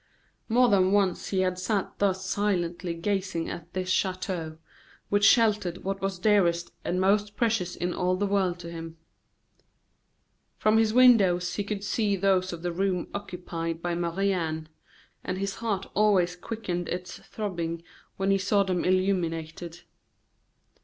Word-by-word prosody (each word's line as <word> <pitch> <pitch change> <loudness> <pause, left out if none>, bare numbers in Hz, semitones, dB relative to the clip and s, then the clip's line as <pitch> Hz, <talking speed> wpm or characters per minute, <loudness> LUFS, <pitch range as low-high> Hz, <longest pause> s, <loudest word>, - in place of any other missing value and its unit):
More 245 +2 +5
than 190 -4 +3
once 195 -3 +1
he 190 -2 0
had 185 -1 0
sat 195 +1 -2
thus 190 -1 +1
silently 180 -3 -1
gazing 185 -1 -2
at 170 0 -8
this 185 -1 -3
chateau, 185 -4 -1 0.5
which 205 0 +2
sheltered 210 -6 +3
what 195 +1 -3
was 195 -1 -2
dearest 175 -4 +2
and 180 - -1
most 205 +2 +2
precious 220 -7 0
in 175 0 -2
all 180 0 +1
the 200 +2 0
world 195 -3 +1
to 170 0 -8
him. 165 -1 -8 1.6
From 215 +1 +3
his 220 -1 +3
windows 195 -8 +5
he 205 - -2
could 200 0 -4
see 205 -1 0
those 185 -1 +2
of 170 -1 -7
the 175 - -1
room 185 0 -1
occupied 170 -4 -5
by 175 0 -1
Marie 175 +3 0
Anne; 160 -3 -3 0.5
and 185 - -3
his 195 +1 -3
heart 210 -4 -2
always 190 -4 +3
quickened 180 -3 -4
its 180 0 -5
throbbing 170 -6 -4 0.3
when 195 0 +1
he 195 - +3
saw 200 +1 +2
them 185 -2 -1
illuminated. 175 -3 -1
185 Hz, 150 wpm, -27 LUFS, 175-200 Hz, 1.6 s, More